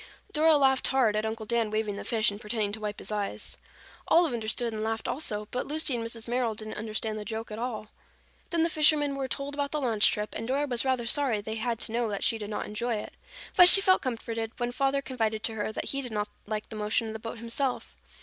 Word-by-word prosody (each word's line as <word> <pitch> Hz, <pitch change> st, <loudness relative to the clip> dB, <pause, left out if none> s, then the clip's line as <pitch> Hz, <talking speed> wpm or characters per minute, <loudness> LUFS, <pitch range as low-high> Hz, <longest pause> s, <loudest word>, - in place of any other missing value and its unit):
Dora 315 Hz, -1 st, +5 dB
laughed 265 Hz, -2 st, +3 dB
hard 250 Hz, -5 st, +3 dB
at 215 Hz, +1 st, 0 dB
Uncle 220 Hz, 0 st, -4 dB
Dan 230 Hz, -1 st, +1 dB
waving 215 Hz, -1 st, -1 dB
the -, -, -6 dB
fish 220 Hz, -2 st, +2 dB
and 205 Hz, +1 st, -9 dB
pretending 210 Hz, -1 st, -1 dB
to 220 Hz, -, -4 dB
wipe 210 Hz, -1 st, -4 dB
his -, -, -5 dB
eyes. 205 Hz, -1 st, -3 dB, 0.5 s
Olive 330 Hz, -5 st, +4 dB
understood 230 Hz, +1 st, -1 dB
and 215 Hz, 0 st, -3 dB
laughed 225 Hz, 0 st, -2 dB
also, 210 Hz, -7 st, -1 dB
but 250 Hz, -, -2 dB
Lucy 300 Hz, -3 st, +1 dB
and 230 Hz, -, -2 dB
Mrs. 230 Hz, 0 st, -3 dB
Merrill 240 Hz, -2 st, 0 dB
didn't 215 Hz, 0 st, -6 dB
understand 215 Hz, 0 st, -2 dB
the -, -, -5 dB
joke 225 Hz, +1 st, -5 dB
at 215 Hz, -, -5 dB
all. 235 Hz, -3 st, -3 dB, 0.6 s
Then 335 Hz, -2 st, +1 dB
the 335 Hz, -, +2 dB
fishermen 300 Hz, -2 st, +4 dB
were 275 Hz, -1 st, -3 dB
told 275 Hz, +3 st, -3 dB
about 285 Hz, -1 st, -1 dB
the 300 Hz, -, -1 dB
launch 230 Hz, -6 st, +3 dB
trip 210 Hz, 0 st, -3 dB
and 225 Hz, -, -5 dB
Dora 275 Hz, +3 st, +1 dB
was 245 Hz, -4 st, +1 dB
rather 260 Hz, -3 st, 0 dB
sorry 250 Hz, -3 st, +1 dB
they 220 Hz, +2 st, -5 dB
had 230 Hz, +1 st, -1 dB
to -, -, -2 dB
know 235 Hz, 0 st, 0 dB
that 200 Hz, -1 st, -3 dB
she 225 Hz, -, +2 dB
did 210 Hz, -1 st, -5 dB
not 210 Hz, -, -3 dB
enjoy 235 Hz, +3 st, -2 dB
it. 210 Hz, -, -6 dB, 0.4 s
But 355 Hz, 0 st, +10 dB
she 390 Hz, -, +11 dB
felt 375 Hz, -1 st, +4 dB
comforted 230 Hz, -2 st, -4 dB
when 240 Hz, 0 st, -1 dB
Father 275 Hz, +2 st, 0 dB
confided 225 Hz, -4 st, -2 dB
to 225 Hz, -, -1 dB
her 220 Hz, 0 st, -2 dB
that -, -, -4 dB
he 275 Hz, -, 0 dB
did 250 Hz, -3 st, -6 dB
not 210 Hz, -1 st, -2 dB, 0.2 s
like 215 Hz, 0 st, -4 dB
the -, -, -7 dB
motion 215 Hz, +2 st, 0 dB
of 220 Hz, -, -5 dB
the 220 Hz, -, -6 dB
boat 225 Hz, +1 st, -6 dB
himself. 235 Hz, +3 st, -2 dB
230 Hz, 245 wpm, -28 LUFS, 215-265 Hz, 0.6 s, she